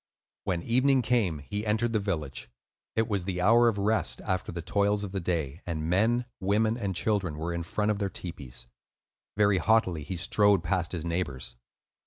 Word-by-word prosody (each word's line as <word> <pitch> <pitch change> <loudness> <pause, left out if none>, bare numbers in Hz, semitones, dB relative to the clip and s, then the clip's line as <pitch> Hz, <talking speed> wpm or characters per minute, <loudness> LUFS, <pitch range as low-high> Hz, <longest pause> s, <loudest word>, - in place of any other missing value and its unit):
When 90 -4 -1
evening 130 +2 +3
came, 105 - +1
he 105 0 -3
entered 110 +2 0
the 110 - +3
village. 75 - -4 0.5
It 110 0 +2
was 100 -5 -1
the 90 -2 -2
hour 115 +6 +5
of 115 -3 +1
rest 105 +2 0
after 95 -2 -2
the 85 -1 -5
toils 100 +3 +1
of 100 - -5
the 95 - -2
day, 85 -3 -2
and 80 -1 -2
men, 115 +6 +2
women, 110 +4 +2
and 100 -6 -3
children 90 -4 0
were 80 +2 -3
in 85 - -2
front 105 +5 0
of 100 - -2
their 100 -2 -1
tepees. 65 -11 -7 0.7
Very 100 -2 +4
haughtily 100 -8 +2
he 85 +6 -5
strode 100 +1 +3
past 90 0 -1
his 85 -3 -4
neighbors. 70 -8 -3
95 Hz, 185 wpm, -28 LUFS, 85-105 Hz, 0.7 s, hour